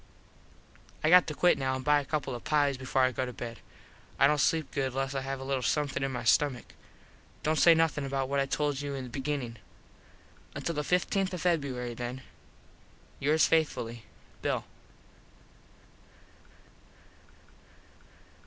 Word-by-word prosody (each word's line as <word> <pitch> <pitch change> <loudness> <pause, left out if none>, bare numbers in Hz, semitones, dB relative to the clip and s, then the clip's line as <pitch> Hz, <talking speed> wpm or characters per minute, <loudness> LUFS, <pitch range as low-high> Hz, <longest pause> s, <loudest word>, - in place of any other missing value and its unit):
I 155 - +3
got 180 -1 +7
to 155 - -4
quit 175 0 +3
now 130 -1 0
and 130 0 -6
buy 150 0 +5
a - - -10
couple 140 -3 -2
of 120 - -7
pies 145 -2 +2
before 130 0 0
I 130 - +3
go 130 - -2
to 125 - -4
bed. 120 -1 -7 0.6
I - - +5
dont 150 +1 +3
sleep 160 -1 +1
good 130 -2 -2
less 135 0 -1
I 135 - -2
have 135 0 -4
a - - -6
little 135 -1 -1
somethin 145 +2 0
on 135 - -1
my 125 - -4
stummick. 130 +2 +1 0.7
Dont 155 0 +1
say 170 -1 +7
nothin 160 -3 +1
about 135 -1 -2
what 140 +1 0
I 135 - +1
told 145 0 -1
you 145 -1 -4
in 135 - -5
the 125 - -8
beginnin. 135 -3 -3 1.0
Until 170 - -3
the 150 - -1
15th 180 +4 +1
Feb. 140 -10 -2
then. 125 +2 -5 1.0
Yours 155 +3 +3
faithfully, 120 -8 0 0.4
_Bill. - - -1
140 Hz, 155 wpm, -29 LUFS, 130-150 Hz, 1.0 s, got